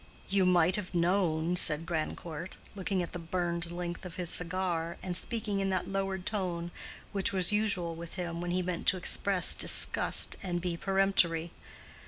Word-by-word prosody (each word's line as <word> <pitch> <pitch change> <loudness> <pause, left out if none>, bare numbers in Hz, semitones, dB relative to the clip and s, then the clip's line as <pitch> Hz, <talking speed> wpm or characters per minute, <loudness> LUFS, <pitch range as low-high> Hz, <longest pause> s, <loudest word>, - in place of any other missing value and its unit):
"You 190 -1 +3
might 180 0 +4
have 195 -3 -6
known," 170 -1 +1
said 160 -2 +4
Grandcourt, 165 +1 -4 0.2
looking 190 -1 -1
at 170 - -5
the 175 - -4
burned 170 0 -2
length 175 0 -5
of 180 -3 -8
his 175 -2 0
cigar, 170 -1 -2
and 180 -1 -3
speaking 210 +1 -2
in 195 0 0
that 185 -2 -1
lowered 195 -1 -2
tone 175 -5 -2 0.4
which 195 -1 -1
was 190 0 +2
usual 200 -5 0
with 165 0 -9
him 170 -2 -4
when 175 - -3
he 180 +1 0
meant 180 -1 -4
to 190 - +5
express 185 +1 +4
disgust - - +3
and 175 -2 -2
be 175 -1 -2
peremptory. 180 -3 +1
180 Hz, 170 wpm, -31 LUFS, 170-190 Hz, 0.4 s, to